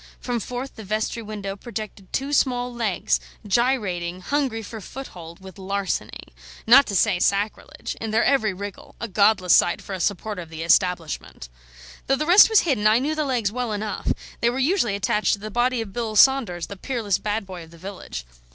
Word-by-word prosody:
From 245 -2 -2
forth 250 +5 -6
the 220 - -8
vestry 215 +3 -2
window 205 -2 -5
projected 210 -3 -8
two 275 +2 -2
small 245 -3 +1
legs, 225 -6 0 0.3
gyrating, 190 -6 0
hungry 260 -2 -1
for 220 +1 -8
foothold, 175 -10 -9
with 190 0 -12
larceny 195 0 -3 0.4
not 265 +5 +7
to 200 - -3
say 190 -1 +3
sacrilege 200 +3 -1
in 225 - -3
their 220 +2 +2
every 220 -7 +2
wriggle: 200 +1 -8
a 230 - -3
godless 200 -2 +3
sight 175 - +4
for 200 - -8
a 190 - -4
supporter 205 +1 -2
of 165 - -10
the 160 0 -6
Establishment. 170 - 0 0.6
Though 270 - +3
the 305 - -2
rest 360 +7 +8
was 440 -2 +5
hidden, 250 -10 +1
I 215 +1 +5
knew 285 +5 0
the 310 -1 -1
legs 240 -7 0
well 245 0 -3
enough; 210 -1 -2 0.3
they 235 - +3
were 245 - -3
usually 265 - +1
attached 205 +1 +1
to 200 - -2
the 215 +1 -7
body 240 +1 +1
of 205 -4 -7
Bill 230 -3 -3
Saunders, 225 -9 +4
the 200 - -9
peerless 210 -4 -1
bad 210 +1 -2
boy 185 -3 -8
of - - -19
the 170 - -15
village. 180 - -7
215 Hz, 195 wpm, -23 LUFS, 190-245 Hz, 0.6 s, rest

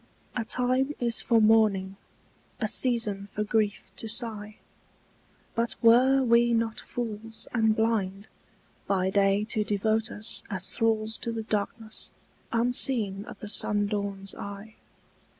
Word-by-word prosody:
A 240 - -1
time 255 +5 0
is 235 -2 +2
for 230 -2 +3
mourning, 215 -3 +3 0.6
a 220 - 0
season 215 -5 +1
for 210 - 0
grief 210 -1 -1
to 225 - -5
sigh; 215 -2 -3 1.0
But 230 0 -1
were 260 +4 +5
we 235 0 +4
not 225 -1 0
fools 225 -2 -5
and 220 -2 +2
blind, 210 -3 -1 0.6
by 190 -1 +1
day 200 +1 +2
to 215 - +1
devote 215 +2 0
us 215 0 +2
As 190 -3 -4
thralls 220 -1 0
to 230 - -3
the 225 -1 -4
darkness, 215 +1 -3 0.4
unseen 230 -4 +1
of - - -11
the 210 - -6
sundawn's 200 -1 0
eye? 200 +2 -8
220 Hz, 130 wpm, -27 LUFS, 205-230 Hz, 1.0 s, were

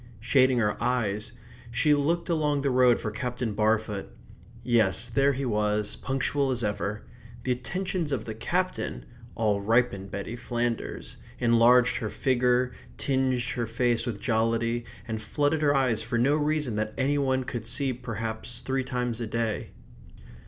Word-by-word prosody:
Shading 130 +2 +3
her 105 -3 0
eyes, 110 -3 0 0.4
she 150 +5 +3
looked 165 +4 +1
along 150 -4 +1
the 140 - +2
road 125 -1 +5
for 105 - -3
Captain 125 0 -3
Barfoot 105 -1 0 0.6
yes, 115 -2 +2
there 135 +5 +3
he 135 +1 -3
was, 105 -2 0
punctual 135 +1 -1
as 125 -2 -1
ever; 105 0 -2 0.4
the 130 - 0
attentions 175 +5 -2
of 135 - -2
the 110 - -4
Captain 180 +11 -2 0.3
all 105 -3 +1
ripened 105 -3 +1
Betty 100 +4 -5
Flanders, 120 - -3 0.2
enlarged 120 +1 +5
her 110 - -3
figure, 125 0 +2 0.3
tinged 130 -2 +1
her 120 -2 -2
face 120 +1 +1
with 110 -4 -3
jollity, 115 +1 0 0.2
and 110 -1 -3
flooded 145 +8 0
her 145 -1 +3
eyes 130 -5 +2
for 115 +1 -2
no 135 +5 +3
reason 150 -6 0
that 110 0 -2
any 140 +2 +1
one 130 -1 +1
could 120 -4 -5
see 135 +2 0
perhaps 115 0 -4
three 130 +1 -1
times 125 -2 -2
a 115 - -2
day. 115 -1 -2
120 Hz, 150 wpm, -27 LUFS, 110-135 Hz, 0.6 s, road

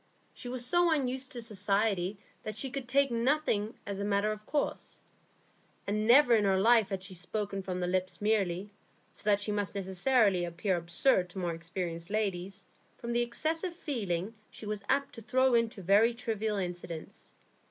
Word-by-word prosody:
She 245 - -8
was 250 -1 -3
so 345 +5 +3
unused 260 -3 -1
to 240 -2 -5
society 200 -2 0 0.2
that 215 0 -6
she 265 +1 -3
could 275 -2 -5
take 275 +1 +3
nothing 235 -3 +1
as 200 -1 -4
a - - -2
matter 205 +1 +1
of 215 0 -6
course, 290 -1 -2 0.9
and 200 - -1
had 215 +1 0
never 245 +1 +7
in 215 - +3
her 190 -1 +3
life 220 -1 +4
spoken 195 +2 -4
from 185 -1 -4
the 180 - 0
lips 185 +1 -1
merely, 205 -2 0 0.4
so - - -16
that 205 -1 +4
she 205 +1 -2
must 205 -1 -2
necessarily 195 0 +2
appear 175 +3 -1
absurd 180 +3 +2
to 180 - -12
more 175 -2 -1
experienced 165 0 -5
ladies, 195 -2 -2 0.3
from 235 0 -4
the 240 - +2
excessive 320 +9 -2
feeling 215 - -3 0.2
she - - -10
was 210 -1 -3
apt 280 0 +1
to 230 - -9
throw 260 +3 +2
into 230 -4 +1
very 210 +6 +4
trivial 220 -3 -2
incidents. 175 -3 -6
210 Hz, 175 wpm, -31 LUFS, 190-240 Hz, 0.9 s, never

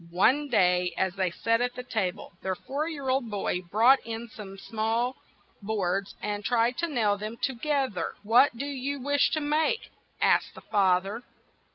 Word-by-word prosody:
One 255 +12 +3
day 180 -7 +2
as 190 -1 +1
they 190 -1 0
sat 230 +6 0
at 245 0 -1
the 250 - -6
ta 220 -6 0
ble, 180 - -11
their 190 0 -2
four 285 - -3
year 285 -5 -6
old 260 -3 +1
boy 195 -3 -1
brought 225 +9 +4
in 230 +1 -6
some 200 -2 -10
small 225 +4 -1 0.5
boards 195 -2 -1
and 205 0 -2
tried 240 +2 +1
to 340 - +1
nail 215 -9 +1
them 215 +3 -5
to 270 - +1
gether. 260 - -1
' - - -30
' - - -35
What 245 0 +6
do 275 - -3
you 280 0 -3
wish 285 +2 +2
to 310 - +2
make?" 305 +9 0 0.3
asked - - +2
the - - -11
fa 195 -4 +3
ther. 210 +5 -6
230 Hz, 195 wpm, -28 LUFS, 195-265 Hz, 0.5 s, What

